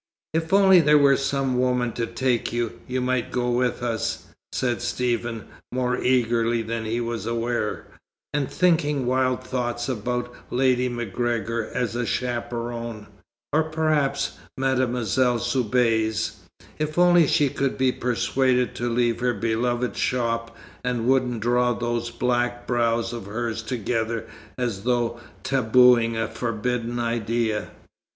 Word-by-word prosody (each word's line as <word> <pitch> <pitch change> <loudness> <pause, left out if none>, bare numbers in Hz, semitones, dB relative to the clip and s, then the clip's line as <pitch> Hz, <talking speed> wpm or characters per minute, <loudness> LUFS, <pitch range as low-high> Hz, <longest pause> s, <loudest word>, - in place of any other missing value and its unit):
"If 160 0 -1
only 190 -2 +7
there 150 -2 +5
were 140 -1 +5
some 135 -2 0
woman 125 -1 +1
to 115 0 -3
take 125 -3 0
you, 120 -1 -2
you 130 0 -1
might 125 -1 -1
go 125 -1 0
with 120 0 0
us," 115 -2 -2 0.3
said 120 -2 -1
Stephen, 120 -2 -2 0.3
more 125 -1 0
eagerly 120 -2 +2
than 115 0 -3
he 115 +2 -1
was 115 -1 -3
aware, 115 -2 -2 0.5
and 145 -2 0
thinking 150 -6 +2
wild 130 0 +1
thoughts 120 -2 -2
about 125 0 -2 0.2
Lady 125 0 +2
MacGregor 115 0 -2
as 120 -2 -2
a 120 -1 -1
chaperon, 120 -2 -3 0.5
or 155 - +4
perhaps 155 -3 0 0.2
Mademoiselle 125 -2 +1
Soubise 115 -3 +1 0.4
if 155 +1 -2
only 175 -2 +6
she 145 0 +3
could 135 +1 -1
be 130 -1 +3
persuaded 125 +1 +1
to 120 0 -2
leave 120 -1 +1
her 125 -1 +1
beloved 120 +3 -1
shop, 115 -2 -1 0.3
and 125 -2 -1
wouldn't 125 -3 +2
draw 120 +1 +2
those 120 0 -2
black 120 0 -1
brows 115 -1 +1
of 115 -5 -6
hers 115 +1 -3
together 115 0 -2 0.3
as 120 -6 -2
though 120 -1 0 0.2
tabooing 125 -2 +4
a 115 0 0
forbidden 120 +1 -2
idea. 115 -2 -1
120 Hz, 130 wpm, -24 LUFS, 115-130 Hz, 0.5 s, only